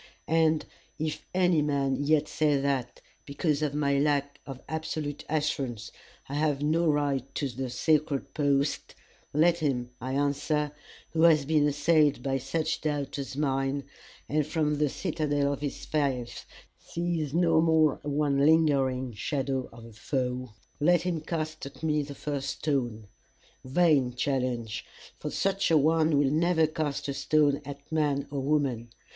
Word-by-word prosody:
"And 160 -1 +2 0.3
if 155 -1 -4
any 180 -3 +3
man 140 -2 +1
yet 150 0 +2
say 150 -3 +1
that, 135 -3 -2 0.2
because 145 +1 -1
of 150 -2 -1
my 140 -2 +2
lack 145 -1 0
of 135 -2 -7
absolute 155 -2 -4
assurance, 140 -7 -2 0.4
I 140 - -7
have 145 -1 0
no 165 +3 +2
right 145 -2 +1
to 145 - -1
the 130 +1 -4
sacred 145 +2 0
post, 140 -1 0 0.4
Let 170 +3 +3
him, 125 -6 -1
I 130 +2 -3
answer, 145 +1 0 0.4
who 160 - 0
has 160 -4 +5
been 150 0 +3
assailed 145 -2 +2
by 135 -1 0
such 145 +5 -2
doubts 145 -2 -2
as 135 0 -5
mine, 135 -1 0 0.4
and 150 0 0
from 150 -2 0
the 150 -1 +2
citadel 145 -1 -1
of 140 - -7
his 145 -2 -4
faith 135 -6 -2 0.3
sees 170 -4 -3
no 165 -2 +4
more 160 -3 +3
one 145 -1 +1
lingering 135 -5 +3
shadow 135 +3 -2
of 115 0 -12
a 115 - -13
foe 125 -1 -3 0.2
let 170 +3 +3
him 175 -3 -1
cast 155 -2 -4
at 140 - -14
me 150 -1 +2
the 140 0 -7
first 140 -2 -3
stone! 120 -8 -1 0.6
Vain 135 -3 +2
challenge! 125 -4 -1 0.4
for - - -4
such 195 0 0
a 165 - +5
one 155 0 +3
will 140 -1 +3
never 160 +1 +3
cast 155 -3 -3
a 140 - -2
stone 145 +1 +2
at 140 +2 -9
man 145 -3 0
or 140 - -2
woman. 135 -5 0
145 Hz, 150 wpm, -28 LUFS, 135-155 Hz, 0.6 s, has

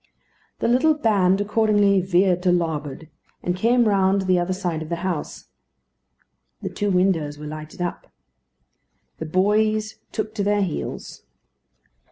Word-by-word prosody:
The - - +1
little 260 +6 +3
band 200 -8 +2
accordingly 205 -2 +3
"veered 180 0 +2
to 180 -1 +2
larboard," 160 -4 -2 0.4
and 175 - -1
came 235 +4 +3
round 195 -1 +2
to - - -5
the 185 -1 +3
other 175 +1 -1
side 180 -4 -2
of 160 - -7
the 170 - -1
house. 175 -5 -4 1.1
The - - -2
two 205 -1 -1
windows 180 -6 +1
were 150 - -9
lighted 155 +3 -7
up. 175 - -5 1.1
The 160 - -5
boys 215 +5 +1
took 215 0 -4
to 210 -2 -2
their 205 0 +2
heels. 175 -5 -5
190 Hz, 145 wpm, -22 LUFS, 175-210 Hz, 1.1 s, little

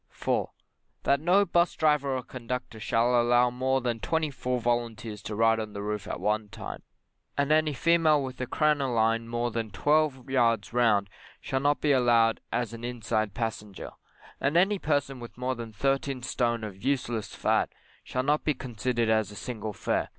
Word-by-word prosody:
4. - - -1 0.5
That 140 - +3
no 180 +6 +4
'bus 175 -1 +2
driver 150 -3 +2
or 130 - -5
conductor 125 -2 -6
shall 120 +3 +2
allow 120 +1 +4
more 130 +2 0
than 120 -2 -2
twenty 160 +3 -1
four 125 -2 -2
volunteers 115 -3 -2
to 105 - -5
ride 115 +1 +3
on 110 -1 -5
the 100 - -5
roof 105 -1 -3
at - - -4
one 105 0 0
time, - - -7 0.6
and 140 +1 +1
any 155 0 +4
female 160 -1 +3
with 130 -1 -6
a 125 - -2
crinoline 120 -7 +1
more 120 +1 -1
than 115 -1 -3
twelve 145 +4 +1
yards 115 -5 +1
round 110 -5 +3 0.3
shall 135 - -2
not 145 +2 +1
be 150 - +3
allowed 120 -3 +3
as 120 -2 -1
an 115 0 -8
inside 110 -4 -2
passenger; 105 -3 -4 0.5
and 145 +4 +1
any 195 +3 +3
person 140 -4 -1
with 120 0 -10
more 125 +1 -1
than 115 -2 -7
thirteen 135 +2 -1
stone 120 -2 0
of 100 -3 -7
useless 120 -6 -1
fat, - - +1 0.3
shall 130 - -2
not 150 +2 +1
be 150 - +1
considered 120 -1 -2
as 110 -2 +2
a 105 - -11
single 110 -2 -5
fare. - - -1
120 Hz, 180 wpm, -28 LUFS, 115-140 Hz, 0.6 s, no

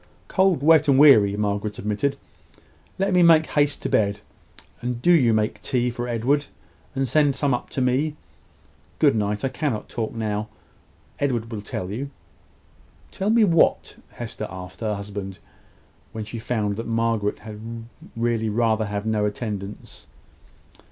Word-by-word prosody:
"Cold, 190 -7 +2
wet, 160 0 +5
and 135 -2 +5
weary," 110 -9 +6
Margaret 105 0 -2
admitted. 105 +7 -1 0.8
"Let 195 0 0
me 180 - +5
make 165 -2 +6
haste 145 -2 0
to - - 0
bed. 100 -1 +1 0.6
And 120 0 -3
do 175 - +3
you 135 -9 +5
make 110 -1 0
tea 125 -1 0
for 120 +1 -4
Edward, 130 +5 0 0.5
and 135 0 0
send 145 +1 +3
some 140 -2 +1
up 120 - -3
to 130 - -3
me. 135 +5 +1 0.8
Good - - +4
night! 105 +1 -1
I - - +1
cannot 130 -4 -3
talk 115 -1 -4
now. 110 -1 -2 0.7
Edward 120 -5 -1
will 110 -2 -4
tell 95 -2 -5
you." 135 +7 -4 1.0
"Tell 195 +2 -2
me 225 0 +5
what?" 170 -5 +3 0.2
Hester - - -6
asked 90 0 -9
her 110 -2 -1
husband, 100 -1 -6 0.8
when 110 -1 -5
she 115 +2 -7
found 105 -3 -2
that 115 - -5
Margaret 115 -2 0
had 105 -1 -10 0.6
really 115 -1 0
rather 110 0 +1
have 100 0 -4
no 110 -1 +1
attendance. 105 -2 -6
115 Hz, 150 wpm, -23 LUFS, 105-140 Hz, 1.0 s, weary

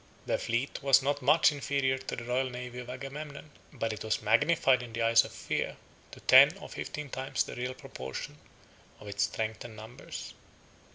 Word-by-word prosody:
Their - - 0
fleet 120 +5 -2
was 135 -1 +5
not 145 +1 0
much 150 +5 +5
inferior 140 -2 0
to 130 - -5
the 120 - -6
royal 125 +2 0
navy 125 0 -7
of 125 0 -8
Agamemnon, 145 +3 -7 0.2
but 115 -1 -2
it 110 - -7
was 110 0 -1
magnified 130 +3 +4
in 120 -2 -9
the 115 0 -1
eyes 115 0 +6
of - - -9
fear - - -3 0.3
to - - -11
ten - - +7
or - - -10
fifteen 150 -2 -6
times 130 +1 -1
the - - -8
real 125 +1 -3
proportion 65 - -7 0.6
of 105 - -12
its 100 0 +1
strength 110 0 -4
and 115 -2 -10
numbers. 110 +3 -9
125 Hz, 185 wpm, -30 LUFS, 115-140 Hz, 0.6 s, ten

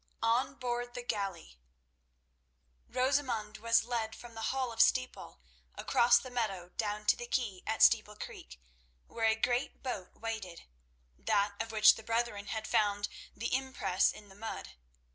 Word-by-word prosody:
On 235 +4 +2
Board 245 -1 -3
the 245 - -5
Galley 195 - -4 1.3
Rosamund 255 -5 0
was 230 +1 +3
led 225 -2 -2
from 240 -1 -12
the 225 0 -2
Hall 260 -2 -1
of 225 - +2
Steeple 255 0 +1 0.3
across 240 0 +4
the 255 - -5
meadow 195 -7 -2
down 210 -1 -2
to - - +5
the 240 - -7
quay 215 -8 -1
at 220 - +2
Steeple 215 -2 +5
Creek, - - -9 0.5
where 225 -1 -1
a 220 - +4
great 245 +3 -1
boat 205 -8 -5
waited—that 170 - -4
of 225 0 -4
which 215 -1 +7
the - - -9
brethren 230 -3 -1
had 220 +1 -3
found 205 -1 +1 0.3
the 230 - -3
impress 260 -8 +1
in 210 - -12
the - - -14
mud. 220 - -6
225 Hz, 150 wpm, -32 LUFS, 205-240 Hz, 1.3 s, which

